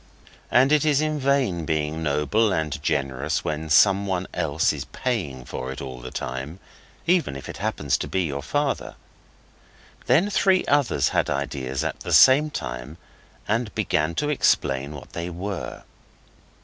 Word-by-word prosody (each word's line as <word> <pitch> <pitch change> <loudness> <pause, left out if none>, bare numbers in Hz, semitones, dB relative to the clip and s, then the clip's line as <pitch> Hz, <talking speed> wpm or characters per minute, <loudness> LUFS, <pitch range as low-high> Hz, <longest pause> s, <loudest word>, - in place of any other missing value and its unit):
And 130 +3 +4
it 150 0 +4
is 150 -3 +3
in 155 -1 0
vain 130 -11 +1
being 80 0 -1
noble 75 +9 +1
and 75 -5 -2
generous 70 0 -1
when 80 +1 -3
someone 95 +2 +4
else 80 -2 +1
is - - -5
paying 80 - -3
for 65 +1 -5
it 65 - -7
all 65 -1 -7
the 65 +1 -8
time, 65 +9 -5 0.5
even 170 - +2
if 70 - -9
it - - -7
happens - - -1
to - - -3
be 95 - 0
your 70 -4 -3
father. 145 - -2 1.1
Then 170 +12 +3
three 190 -2 +3
others 145 -3 +2
had - - 0
ideas 70 -2 -2
at - - -3
the - - -4
same 145 +4 +7
time 65 - -6 0.5
and 110 0 -1
began 80 +2 0
to 145 - -1
explain 70 - +1
what 70 - -11
they 85 +1 -4
were. 95 +2 -5
85 Hz, 155 wpm, -24 LUFS, -, 1.1 s, same